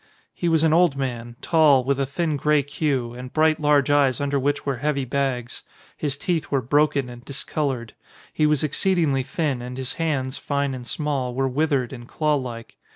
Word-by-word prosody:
He 175 Hz, -, -1 dB
was 160 Hz, -1 st, +3 dB
an 160 Hz, -1 st, +4 dB
old 170 Hz, -4 st, +4 dB
man, 120 Hz, -3 st, -4 dB
tall, 155 Hz, -6 st, +5 dB
with 140 Hz, +1 st, 0 dB
a 135 Hz, -, 0 dB
thin 155 Hz, +2 st, -1 dB
grey 150 Hz, +1 st, +2 dB
queue, 135 Hz, -4 st, -1 dB
and 125 Hz, +1 st, -8 dB
bright 155 Hz, 0 st, +3 dB
large 145 Hz, -2 st, +3 dB
eyes 140 Hz, -4 st, +3 dB
under 140 Hz, 0 st, 0 dB
which 145 Hz, +2 st, -1 dB
were 140 Hz, -3 st, -1 dB
heavy 140 Hz, 0 st, -1 dB
bags. 130 Hz, -2 st, -2 dB, 0.3 s
His 140 Hz, -3 st, -3 dB
teeth 165 Hz, +1 st, -1 dB
were 140 Hz, -, +2 dB
broken 140 Hz, +1 st, +2 dB
and 120 Hz, 0 st, -10 dB
discoloured. 135 Hz, -4 st, -3 dB, 0.4 s
He 155 Hz, -, +2 dB
was 150 Hz, -1 st, +2 dB
exceedingly 155 Hz, -3 st, +1 dB
thin, 140 Hz, -1 st, -2 dB
and 125 Hz, +1 st, -7 dB
his 130 Hz, -1 st, -3 dB
hands, 135 Hz, -5 st, -1 dB
fine 140 Hz, -1 st, -1 dB
and 125 Hz, -2 st, -7 dB
small, 135 Hz, -5 st, -2 dB
were 135 Hz, +1 st, +1 dB
withered 135 Hz, -2 st, 0 dB
and 120 Hz, 0 st, -9 dB
claw 150 Hz, +2 st, 0 dB
like. 120 Hz, -5 st, -5 dB
140 Hz, 190 wpm, -23 LUFS, 130-150 Hz, 0.4 s, tall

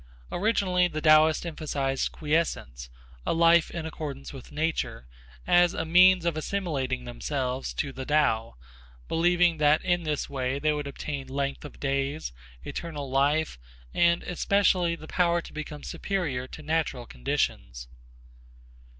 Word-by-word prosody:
Originally 185 Hz, -3 st, +2 dB
the 155 Hz, -, -4 dB
Taoists 155 Hz, +1 st, +5 dB
emphasized 145 Hz, -5 st, -2 dB
quiescence, 150 Hz, -, -2 dB, 0.3 s
a -, -, 0 dB
life 170 Hz, 0 st, +5 dB
in 170 Hz, -2 st, -5 dB
accordance 145 Hz, -4 st, -6 dB
with 135 Hz, -3 st, -11 dB
nature, 160 Hz, -, -2 dB, 0.4 s
as 175 Hz, 0 st, +4 dB
a 160 Hz, -, -2 dB
means 180 Hz, +1 st, +6 dB
of 170 Hz, -2 st, +1 dB
assimilating 150 Hz, -8 st, -2 dB
themselves 130 Hz, +1 st, -3 dB
to 140 Hz, -2 st, -3 dB
the 130 Hz, -, -6 dB
Tao, 130 Hz, -, +1 dB, 0.5 s
believing 175 Hz, 0 st, +3 dB
that 150 Hz, 0 st, +3 dB
in 175 Hz, -1 st, +2 dB
this 150 Hz, -3 st, -2 dB
way 130 Hz, -1 st, -2 dB
they 150 Hz, +2 st, +1 dB
would 145 Hz, -1 st, -3 dB
obtain 140 Hz, 0 st, -5 dB
length 140 Hz, +1 st, -3 dB
of 145 Hz, -, -11 dB
days, 140 Hz, -, -2 dB, 0.3 s
eternal 145 Hz, -5 st, -5 dB
life 145 Hz, -, +1 dB, 0.3 s
and 170 Hz, 0 st, +3 dB
especially 180 Hz, -1 st, +2 dB
the 155 Hz, -, -11 dB
power 175 Hz, 0 st, +2 dB
to -, -, -10 dB
become 150 Hz, -1 st, -7 dB
superior 150 Hz, -11 st, -2 dB
to 155 Hz, -, -10 dB
natural 155 Hz, -5 st, -1 dB
conditions. -, -, -2 dB
155 Hz, 135 wpm, -27 LUFS, 135-170 Hz, 0.5 s, means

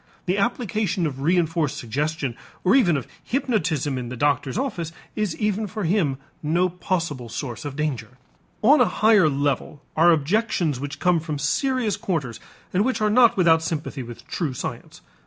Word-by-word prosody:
The 190 Hz, +2 st, 0 dB
application 210 Hz, -5 st, 0 dB
of 140 Hz, -4 st, -3 dB
reënforced 165 Hz, -1 st, +1 dB
suggestion 145 Hz, +1 st, -2 dB, 0.3 s
or 185 Hz, -, +4 dB
even 180 Hz, -, +4 dB
of 125 Hz, -, -5 dB, 0.2 s
hypnotism 180 Hz, -, 0 dB
in 120 Hz, -1 st, -5 dB
the 125 Hz, -, -6 dB
doctor's 140 Hz, -, +1 dB
office 205 Hz, -, -2 dB, 0.2 s
is 210 Hz, -6 st, -1 dB
even 210 Hz, 0 st, 0 dB
for 210 Hz, +2 st, -5 dB
him 165 Hz, -6 st, +1 dB, 0.2 s
no 170 Hz, +4 st, +2 dB
possible 170 Hz, -8 st, -3 dB
source 120 Hz, +1 st, -5 dB
of 145 Hz, -2 st, -5 dB
danger. 130 Hz, -5 st, -3 dB, 0.5 s
On 275 Hz, +5 st, +6 dB
a -, -, +7 dB
higher 215 Hz, -7 st, +4 dB
level 140 Hz, 0 st, -1 dB, 0.2 s
are 165 Hz, +2 st, +5 dB
objections 165 Hz, -, +1 dB
which 145 Hz, +2 st, -5 dB
come 180 Hz, -2 st, +3 dB
from 155 Hz, -2 st, -4 dB
serious 215 Hz, -, 0 dB
quarters 165 Hz, -, -3 dB, 0.3 s
and 190 Hz, +3 st, +3 dB
which 260 Hz, +2 st, 0 dB
are 215 Hz, -1 st, +2 dB
not 240 Hz, -1 st, +5 dB
without 165 Hz, -3 st, +5 dB
sympathy 155 Hz, -3 st, -3 dB
with 120 Hz, 0 st, -10 dB
true 145 Hz, -7 st, -2 dB
science. -, -, -6 dB
165 Hz, 165 wpm, -23 LUFS, 145-205 Hz, 0.5 s, a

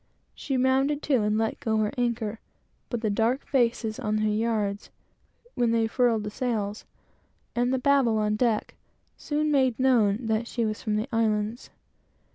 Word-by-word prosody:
She 270 Hz, -3 st, -3 dB
rounded 270 Hz, +3 st, +2 dB
to 265 Hz, -6 st, +2 dB
and 210 Hz, 0 st, +1 dB
let 225 Hz, 0 st, -1 dB
go 220 Hz, -5 st, 0 dB
her 215 Hz, -1 st, +1 dB
anchor, 230 Hz, -3 st, -2 dB, 0.5 s
but 240 Hz, -3 st, -3 dB
the 215 Hz, -3 st, 0 dB
dark 230 Hz, +6 st, 0 dB
faces 235 Hz, -4 st, 0 dB
on 215 Hz, -4 st, -1 dB
her 215 Hz, 0 st, +1 dB
yards, 210 Hz, -2 st, -1 dB, 0.6 s
when 240 Hz, -1 st, +1 dB
they 230 Hz, -1 st, +2 dB
furled 225 Hz, -1 st, +1 dB
the 210 Hz, -, -5 dB
sails, 215 Hz, -4 st, -3 dB, 0.7 s
and 245 Hz, +1 st, +1 dB
the 260 Hz, -, +1 dB
Babel 260 Hz, -4 st, +3 dB
on 210 Hz, 0 st, +1 dB
deck, 225 Hz, -1 st, 0 dB, 0.4 s
soon 300 Hz, 0 st, -1 dB
made 260 Hz, -5 st, +2 dB
known 235 Hz, -4 st, +2 dB
that 220 Hz, +1 st, 0 dB
she 235 Hz, -1 st, -1 dB
was 215 Hz, -1 st, -3 dB
from 215 Hz, -1 st, -1 dB
the 215 Hz, +4 st, -1 dB
Islands. 220 Hz, +1 st, 0 dB
230 Hz, 165 wpm, -26 LUFS, 215-255 Hz, 0.7 s, Babel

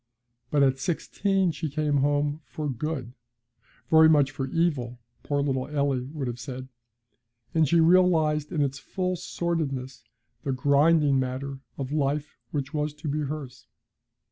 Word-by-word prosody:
But 145 Hz, -1 st, +3 dB
at 135 Hz, -1 st, +2 dB
sixteen 190 Hz, +5 st, 0 dB
she 155 Hz, +1 st, -4 dB
came 150 Hz, 0 st, 0 dB
home 145 Hz, +2 st, +1 dB
'for 150 Hz, 0 st, -5 dB
good'; 135 Hz, -1 st, -3 dB, 0.8 s
very 160 Hz, 0 st, +8 dB
much 145 Hz, -3 st, +4 dB
for 135 Hz, -2 st, -3 dB
evil, 135 Hz, -7 st, 0 dB, 0.2 s
poor 145 Hz, -1 st, 0 dB
little 130 Hz, -2 st, -1 dB
Eily 140 Hz, -4 st, 0 dB
would 150 Hz, -3 st, -4 dB
have 120 Hz, -1 st, -4 dB
said, 130 Hz, +1 st, -7 dB, 0.8 s
as 160 Hz, -3 st, +3 dB
she 170 Hz, -, +4 dB
realised 160 Hz, -3 st, +4 dB
in 155 Hz, -5 st, +1 dB
its 140 Hz, 0 st, -2 dB
full 185 Hz, +2 st, -2 dB
sordidness 135 Hz, -9 st, -3 dB, 0.4 s
the 135 Hz, -, -1 dB
grinding 145 Hz, +1 st, +4 dB
manner 130 Hz, +1 st, -3 dB, 0.2 s
of 135 Hz, -1 st, -4 dB
life 145 Hz, 0 st, -1 dB
which 140 Hz, -2 st, -3 dB
was 150 Hz, -1 st, -1 dB
to 150 Hz, +1 st, -7 dB
be 150 Hz, +1 st, -1 dB
hers. 145 Hz, -3 st, -5 dB
145 Hz, 145 wpm, -26 LUFS, 135-155 Hz, 0.8 s, very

